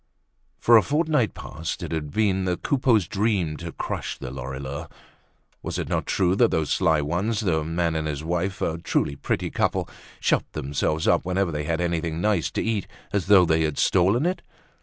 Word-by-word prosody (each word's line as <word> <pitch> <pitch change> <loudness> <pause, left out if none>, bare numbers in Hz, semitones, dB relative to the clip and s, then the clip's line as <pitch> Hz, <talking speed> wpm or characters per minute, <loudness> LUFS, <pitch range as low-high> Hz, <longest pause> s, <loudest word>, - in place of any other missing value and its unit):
For 120 0 +6
a - - +6
fortnight 150 -4 +1
past 80 +1 -5
it - - -5
had 80 -2 -3
been 95 +2 +1
the 90 -1 0
Coupeaus' 120 -9 +2
dream 95 -7 0
to 85 -1 -6
crush - - -4
the 65 -2 -7
Lorilleuxs. 65 +1 -6 0.7
Was - - -4
it - - -3
not - - -1
true 95 -1 +2
that 120 - +5
those 80 -2 -1
sly 80 -2 +3
ones, 95 +9 -1
the 80 -7 +1
man 85 +1 0
and 80 -1 -1
his 75 -1 -4
wife, 90 +3 -2
a 80 0 -1
truly 70 - 0
pretty - - -2
couple, - - 0 0.3
shut - - 0
themselves 75 +3 -1
up - - +3
whenever 90 0 0
they 75 -1 -3
had 80 +1 -1
anything 85 -2 -1
nice 100 -3 +1
to - - -2
eat 110 -4 -1 0.3
as 100 -5 0
though 95 -3 +7
they 80 -1 +2
had 75 -2 -1
stolen 100 - +3
it? 180 +1 -1
85 Hz, 190 wpm, -24 LUFS, 80-100 Hz, 0.7 s, though